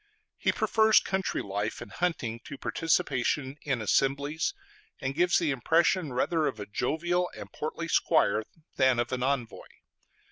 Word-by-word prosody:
He - - +2
prefers 220 0 +4
country 190 0 -2
life 100 +2 -3
and - - -9
hunting 140 -10 -2
to 140 - -8
participation 135 -3 0
in 135 -6 -1
assemblies, 140 - +1 0.4
and 130 +1 -2
gives 175 +4 +3
the 165 -4 +1
impression 160 +4 +2
rather 155 +5 +1
of 110 - -4
a 105 - -5
jovial 175 +10 -1
and - - -9
portly 160 +2 -4
squire 155 -10 +2 0.3
than 130 -2 +4
of 120 0 -1
an 130 -1 -2
envoy. 130 -3 -2
140 Hz, 145 wpm, -28 LUFS, 125-170 Hz, 0.4 s, prefers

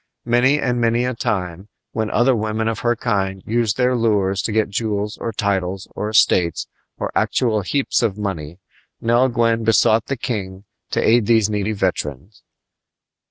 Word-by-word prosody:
Many 125 +4 +3
and 125 -3 0
many 115 +1 +2
a 125 - -1
time, 95 -4 -3 0.2
when 110 -1 -2
other 125 +1 +3
women 110 0 -1
of 115 -2 -2
her 120 0 +1
kind 95 -5 -2
used 115 -1 0
their 125 0 +2
lures 100 -5 +1
to - - -2
get 110 -1 +1
jewels 105 0 -2
or 115 - -3
titles 95 -2 -2
or 105 - -3
estates 90 -6 +2 0.3
or - - -3
actual 110 -4 +1
heaps 135 +9 0
of 110 -4 0
money, 85 -6 -4 0.4
Nell 120 +3 +3
Gwyn 115 -1 +1
besought 110 0 +3
the 135 - -2
king 100 -6 -4 0.3
to - - 0
aid 115 -2 +4
these 110 -3 +3
needy 105 +1 -1
veterans. 90 - -3
110 Hz, 160 wpm, -20 LUFS, 100-120 Hz, 0.4 s, aid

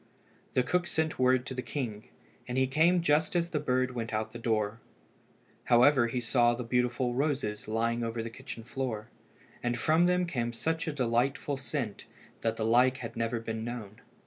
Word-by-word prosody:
The 125 - +4
cook 175 +7 0
sent 160 -2 -1
word 130 0 +3
to 135 - -5
the 125 - -3
king, 115 -3 -4 0.4
and 125 +1 -3
he 130 - +4
came 165 +6 +3
just 155 +2 +2
as 170 0 +1
the 150 - 0
bird 130 -1 +1
went 115 -2 -4
out 110 0 0
at - - -21
the 120 - -7
door. 110 -2 0 0.9
However 125 +1 +5
he 125 +2 -2
saw 120 0 +3
the 125 - -4
beautiful 125 +1 0
roses 130 -6 -1
lying 115 +2 0
all 115 - -1
over 115 0 -3
the 115 - -6
kitchen 115 0 -8
floor, 120 -3 -4 0.5
and 120 0 -1
from 160 +7 +3
them 180 0 +2
came 120 -8 -2
such 160 +8 -2
a - - 0
delightful 135 +1 0
scent 130 -4 -4 0.4
that 115 0 0
the 110 - -1
like 125 +3 +4
had 115 - -7
never 115 +1 -1
been 115 0 -4
known. 115 -3 -6
125 Hz, 195 wpm, -30 LUFS, 115-140 Hz, 0.9 s, However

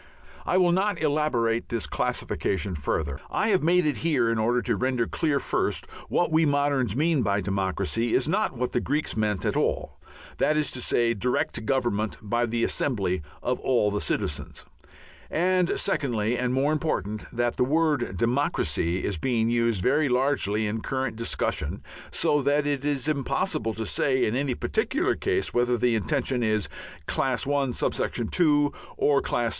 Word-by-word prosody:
I 180 - +2
will 180 -2 +4
not 190 0 +1
elaborate 145 -7 +1
this 115 -2 -1
classification 100 -1 -1
further. 70 -2 -2
I 215 - 0
have 190 -3 +3
made 175 +2 +3
it 150 - 0
here 135 -8 +1
in 115 - 0
order 120 +3 +2
to - - +1
render 125 -2 0
clear 150 0 0
first, - - -1
that - - -15
what 175 - +1
we 160 +1 +4
moderns 140 -6 +1
mean 155 0 +2
by 100 -2 +1
democracy 100 +4 -1
is 130 - +2
not 190 - 0
what 125 +1 -1
the - - +1
Greeks 150 +5 -1
meant 105 -3 0
at - - 0
all, - - -1 0.4
that 155 - +2
is 150 -2 0
to 130 - -3
say, 120 -1 +2
direct 125 +1 -1
government 120 -5 0
by 120 +3 0
the 115 0 -1
assembly 95 - 0 0.2
of 125 - -1
all 120 -5 +2
the 105 - -1
citizens, 75 - -3 0.6
and 180 +1 +1
secondly 120 - 0
and 125 0 -1
more 135 +4 +2
important, 110 - -2
that 120 0 -1
the - - +3
word 145 - +1
"democracy" 105 - 0
is 100 - -1
being 115 +3 0
used 115 -5 +1
very 145 +2 +2
largely 125 -5 +1
in 110 +1 -2
current 130 -2 -2
discussion, 115 +1 -2 0.3
so 145 - +1
that 145 +2 +2
it 145 -2 -1
is 145 -2 -1
impossible 130 -6 -1
to 110 - -3
say 130 +3 +1
in 110 - -1
any 135 -1 0
particular 265 +9 0
case 385 -1 -1
whether 120 0 +2
the 120 0 +2
intention 125 +3 0
is 110 -3 0 0.4
Class 130 - 0
I.(2) 145 +2 +1 0.2
or 145 -1 +3
Class 120 - -1
II. - - +1
125 Hz, 170 wpm, -26 LUFS, 110-145 Hz, 0.6 s, will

